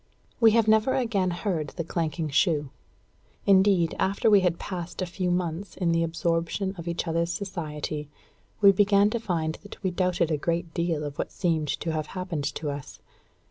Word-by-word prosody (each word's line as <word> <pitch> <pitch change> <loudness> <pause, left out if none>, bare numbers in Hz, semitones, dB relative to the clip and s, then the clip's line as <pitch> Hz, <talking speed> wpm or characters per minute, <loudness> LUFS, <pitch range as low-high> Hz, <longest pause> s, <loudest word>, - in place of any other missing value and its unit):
We 230 -2 +7
have 225 -1 +3
never 220 +4 +4
again 225 -8 +1
heard 175 -3 -2
the 170 - -1
clanking 160 -1 -2
shoe. 150 -2 +1 0.7
Indeed, 190 -4 +4
after 200 +3 +2
we 205 - +8
had 180 -3 +1
passed 175 -2 -6
a 185 - 0
few 180 +1 -2
months 175 +1 -2
in 175 -3 +1
the 165 0 +2
absorption 165 +3 -1
of 170 -2 -8
each 170 +1 -2
other's 170 +1 0
society, 155 -5 -4 0.5
we 200 -1 +9
began 200 +1 +4
to 235 - -1
find 165 -7 -2
that 205 +1 -12
we 185 - +1
doubted 180 -2 0
a 155 - +1
great 170 +2 -2
deal 170 -3 -1
of 145 -1 -6
what - - -2
seemed 165 -4 0
to 165 - -1
have 155 -1 -2
happened 175 -6 -3
to 150 0 -3
us. 140 -1 -8
170 Hz, 180 wpm, -26 LUFS, 160-195 Hz, 0.7 s, we